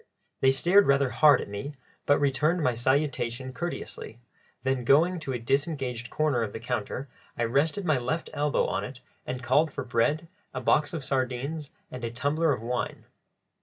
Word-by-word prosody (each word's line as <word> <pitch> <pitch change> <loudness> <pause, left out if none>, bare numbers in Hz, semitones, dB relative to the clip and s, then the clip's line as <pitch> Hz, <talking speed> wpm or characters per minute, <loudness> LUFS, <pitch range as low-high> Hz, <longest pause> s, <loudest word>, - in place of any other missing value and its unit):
They 135 - +4
stared 175 +9 +4
rather 140 -2 +3
hard 150 -2 +5
at - - -6
me, 100 +9 -6 0.3
but 145 - +5
returned 150 +5 +1
my 125 -3 +2
salutation 130 0 -1
courteously; 170 -7 -6 0.4
then 130 -1 0
going 165 +8 +4
to 150 -4 -5
a 125 - -1
disengaged 130 -1 -1
corner 150 -5 +1
of 110 -3 -3
the - - -5
counter, 120 +3 -3 0.3
I 120 - 0
rested 145 - +1
my 155 -6 +2
left 160 +7 -3
elbow 145 0 +1
on - - -1
it 130 -1 -8 0.3
and 125 0 -4
called 145 +6 +3
for - - -4
bread, 130 +7 0 0.3
a - - -1
box 145 +5 +2
of 145 -5 -5
sardines, 135 +3 -2 0.2
and 125 -1 -7
a 115 - -1
tumbler 145 +6 +1
of 125 -5 -2
wine. 125 +1 -3
135 Hz, 175 wpm, -27 LUFS, 125-150 Hz, 0.4 s, hard